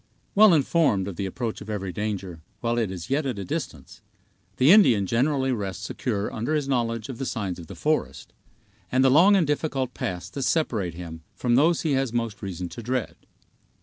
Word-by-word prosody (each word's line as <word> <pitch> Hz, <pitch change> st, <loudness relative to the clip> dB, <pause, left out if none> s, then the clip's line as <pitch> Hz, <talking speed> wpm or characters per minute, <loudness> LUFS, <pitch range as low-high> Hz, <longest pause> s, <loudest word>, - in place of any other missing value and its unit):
Well 215 Hz, 0 st, +7 dB
informed 140 Hz, -, +2 dB
of 100 Hz, -, -5 dB
the 95 Hz, +3 st, -3 dB
approach 115 Hz, +3 st, -4 dB
of 105 Hz, -, -9 dB
every 100 Hz, -3 st, -3 dB
danger, 95 Hz, -4 st, -4 dB, 0.2 s
while 120 Hz, +2 st, 0 dB
it 110 Hz, -4 st, 0 dB
is 95 Hz, +4 st, -7 dB
yet 140 Hz, +1 st, +1 dB
at 125 Hz, -5 st, -3 dB
a 100 Hz, -, -5 dB
distance, -, -, -6 dB, 0.6 s
the 135 Hz, +5 st, +6 dB
Indian 125 Hz, -, +6 dB
generally 130 Hz, +5 st, +1 dB
rests 100 Hz, -6 st, -3 dB
secure 105 Hz, -5 st, -3 dB
under 120 Hz, +8 st, -1 dB
his 145 Hz, -3 st, -1 dB
knowledge 115 Hz, -4 st, -1 dB
of 130 Hz, -4 st, -7 dB
the 135 Hz, -, -2 dB
signs 100 Hz, -7 st, -3 dB
of 85 Hz, -, -10 dB
the -, -, -9 dB
forest, 75 Hz, -, -2 dB, 0.6 s
and 130 Hz, +1 st, +3 dB
the 135 Hz, -, +5 dB
long 180 Hz, +9 st, +6 dB
and 185 Hz, -4 st, +3 dB
difficult 140 Hz, -3 st, -1 dB
paths 90 Hz, +1 st, -4 dB
that 140 Hz, -, -5 dB
separate 110 Hz, -, 0 dB
him 80 Hz, -2 st, -8 dB
from 120 Hz, -1 st, 0 dB
those 155 Hz, +7 st, +4 dB
he 160 Hz, -, -1 dB
has 135 Hz, -3 st, +1 dB
most 115 Hz, -3 st, -2 dB
reason 90 Hz, -3 st, -5 dB
to 120 Hz, -, -8 dB
dread. 125 Hz, +1 st, -2 dB
115 Hz, 200 wpm, -25 LUFS, 95-140 Hz, 0.6 s, Well